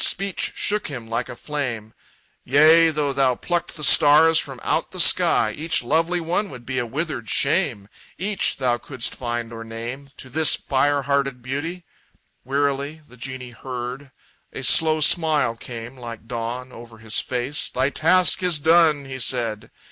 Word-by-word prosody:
Speech 195 0 -1
shook 210 0 0
him 125 -6 -7
like 115 +2 -3
a - - -7
flame: 120 -7 -5 0.5
"Yea, 160 +5 +6
though 150 -3 -1
thou 135 -2 +2
plucked 175 +6 -3
the 150 - -7
stars 155 +2 +6
from - - -7
out - - 0
the - - -9
sky, 110 - +4
Each 155 -3 -1
lovely 165 +7 +1
one 175 +5 -1
would 120 -6 -11
be 130 +1 -2
a 120 - -3
withered 140 -4 -4
shame 140 - 0 0.3
Each 195 +1 -1
thou 125 -3 0
couldst 130 -1 -3
find 120 -2 -4
or 115 0 -7
name 120 +5 -7
To - - -10
this 155 +5 +3
fire 140 +1 0
hearted 140 -2 -1
beauty!" 160 +7 -5 0.6
Wearily 140 +3 -1
The 125 - -16
genie 130 0 -8
heard. 125 +2 -7 0.4
A 135 - -7
slow 155 +4 +4
smile 150 -5 +2
came 120 +1 -9
like 115 -2 -9
dawn 120 +2 -5
Over 115 -2 -12
his 110 -1 -1
face. 130 +3 -1
"Thy 130 +2 0
task 180 +5 +3
is 180 -3 +2
done!" 160 -2 +3
he 130 -1 -7
said. 115 -3 -2
135 Hz, 165 wpm, -22 LUFS, 120-155 Hz, 0.6 s, Yea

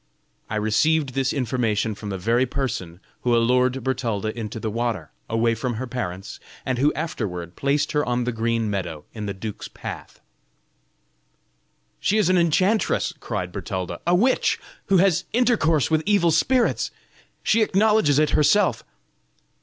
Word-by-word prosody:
I 110 - -3
received 135 +8 +2
this 135 +1 0
information 115 -5 0
from 105 0 -7
the 95 - -3
very 115 +7 +1
person 95 -10 -4 0.2
who 120 -1 +2
allured 125 +2 +2
Bertalda 115 -5 -2
into 110 -1 -5
the 110 -1 -3
water, 115 -8 -2 0.2
away 115 +1 +2
from 120 +1 -3
her 125 +4 -3
parents, 105 -6 -5 0.3
and 130 -2 -1
who 145 +3 +4
afterward 95 - -4
placed 145 +2 0
her 150 0 +1
on 125 -1 0
the 125 - -1
green 115 -1 0
meadow 95 -7 -4
in 105 -2 -5
the 100 - -2
duke's 105 +2 -6
path." - - -8 1.8
"She 210 - +1
is 205 -5 +3
an 185 - +4
enchantress!" 185 +6 +2
cried 90 -1 -4
Bertalda, 95 -1 -4
"a 175 - +4
witch, 245 +8 +2 0.3
who 195 - +4
has 185 -2 +3
intercourse 220 - +2
with 155 -1 +3
evil 200 -5 +4
spirits. 240 +10 +2 0.5
She 225 - +3
acknowledges 210 -7 +3
it 155 0 +3
herself." 175 +6 +3
125 Hz, 150 wpm, -23 LUFS, 110-160 Hz, 1.8 s, who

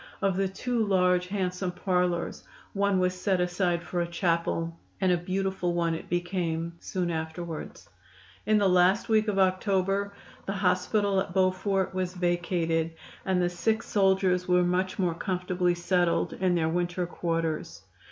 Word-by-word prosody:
Of 195 -2 +1
the 195 +1 +1
two 235 +4 -1
large 180 -3 +2
handsome 185 -1 -2
parlors 180 -2 -1 0.3
one 200 -1 +2
was 180 0 +2
set 185 0 0
aside 180 -1 0
for 175 0 -2
a 170 - -1
chapel, 170 -1 -1 0.2
and 190 -2 +2
a - - +4
beautiful 185 0 -1
one 170 -1 +1
it 160 - -6
became 175 -2 -2
soon 180 -2 -2
afterwards. 160 0 -5 0.6
In 215 0 +4
the 205 -2 +3
last 180 +4 +3
week 220 0 +3
of 205 -2 0
October 195 +1 +1 0.4
the 195 - -1
hospital 195 +1 +1
at 190 - -4
Beaufort 190 0 +1
was 185 -1 -2
vacated, 170 -2 0 0.3
and 190 -1 +2
the 175 - +2
sick 220 +5 0
soldiers 190 -2 +2
were 180 0 +4
much 185 +1 0
more 180 -4 +1
comfortably 180 0 -1
settled 175 0 +1
in 185 -1 +1
their 160 -2 +1
winter 175 +1 -1
quarters. 165 - -3
180 Hz, 150 wpm, -28 LUFS, 175-190 Hz, 0.6 s, a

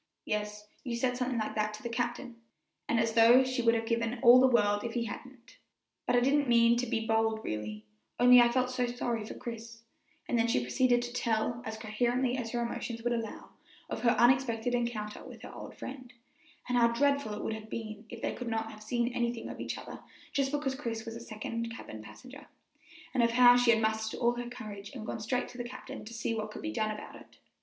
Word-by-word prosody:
"Yes, 210 0 -3 0.2
you 245 -3 -3
said 250 +1 0
something 250 0 -1
like 215 - -2
that 215 0 -1
to 215 - -13
the - - -2
captain;" 240 +1 -3 0.5
and 235 - +2
as 225 0 +1
though 235 +3 +7
she 255 -1 -1
would 230 0 +4
have 225 0 -1
given 230 +1 -1
all 245 +1 +9
the 260 - +6
world 205 -4 +3
if 235 0 -4
he 235 -1 0
hadn't, 255 +2 -10 0.5
"but 245 - +3
I 245 - +5
didn't 280 +2 +3
mean 235 0 +5
to 250 +1 -1
be 225 0 -1
bold 225 0 +1
really, 105 0 -5 0.3
only 245 0 +8
I 240 - +5
felt 255 +1 +1
so 250 -1 0
sorry 240 -2 -2
for 210 - -8
Chris;" 230 -1 -8 0.4
and 240 - +1
then 230 - +3
she 230 - +2
proceeded 240 - +2
to 240 0 -6
tell, 235 0 0
as 220 0 -5
coherently 240 +4 0
as 245 -3 -3
her 240 +1 -1
emotions 235 0 -4
would 240 0 +1
allow, 230 -2 -5 0.4
of - - -3
her 240 - +4
unexpected 245 -1 +3
encounter 235 -3 -2
with - - -11
her - - -9
old - - -9
friend, 260 -2 -8 0.6
and 250 -1 +2
how 235 - +6
dreadful 280 -1 +1
it 210 - -6
would - - -2
have 220 0 -8
been 215 -1 -6
if 235 -2 -9
they - - 0
could 250 - -6
not 225 -1 -2
have 215 - -12
seen 235 +2 0
anything 235 -1 -2
of - - -7
each - - -3
other - - -9 0.3
just 275 -1 +1
because 290 -2 -1
Chris 235 -5 -4
was 225 - -6
a - - -6
second 230 0 -5
cabin 110 - -9
passenger, 265 - -12 0.7
and 255 - +2
of 235 - +4
how 245 +1 +7
she 245 -1 +3
had 230 -1 +6
mustered 220 0 -1
all 235 -1 +3
her 240 0 -5
courage 205 -4 -8
and 220 -4 -6
gone - - -4
straight 245 +4 -1
to 245 - -11
the - - -2
captain 250 +1 -8
to 220 - -10
see 230 0 -2
what 215 -1 -3
could - - -9
be 320 0 -3
done 215 -2 0
about 210 0 -7
it. - - -15
235 Hz, 230 wpm, -31 LUFS, 220-245 Hz, 0.7 s, all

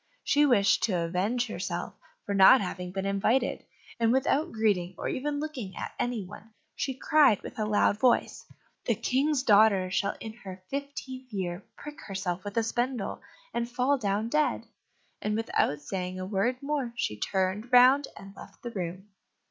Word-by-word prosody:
She 295 0 +3
wished 200 -7 +4
to 215 - -2
avenge 185 +9 0
herself 180 -5 -4 0.3
for 200 - -2
not 195 +7 +8
having 180 -2 -4
been 195 +1 -3
invited, 215 +6 +1 0.4
and 230 -1 +3
without 275 +5 +1
greeting, 200 -5 0
or - - -4
even 290 +2 -2
looking 275 -11 -5
at - - -6
any 240 -4 -1
one, 215 +4 -13 0.2
she 265 -2 -2
cried 275 -6 +4
with - - -8
a 215 - 0
loud 210 0 +2
voice, 250 0 +2 0.4
"The - - +1
King's 275 +1 +1
daughter 200 -5 +4
shall 200 +2 0
in 220 -1 -7
her 190 -5 -10
fifteenth 265 -2 -6
year 185 -3 -3 0.2
prick 295 0 -9
herself 190 -2 -4
with 205 +2 -6
a 230 - +3
spindle, 240 -1 -2 0.3
and 235 0 -2
fall 255 +3 +1
down 205 0 -1
dead." 300 +3 +1 0.6
And, 210 0 -1
without 215 -9 0
saying 185 +3 -4
a 185 - -4
word 215 +7 -1
more, 280 -5 -2
she 105 - -2
turned 190 - -1
round 255 +3 +6
and 195 0 -11
left - - -14
the 240 - -5
room. 185 -1 -5
220 Hz, 170 wpm, -28 LUFS, 190-255 Hz, 0.6 s, not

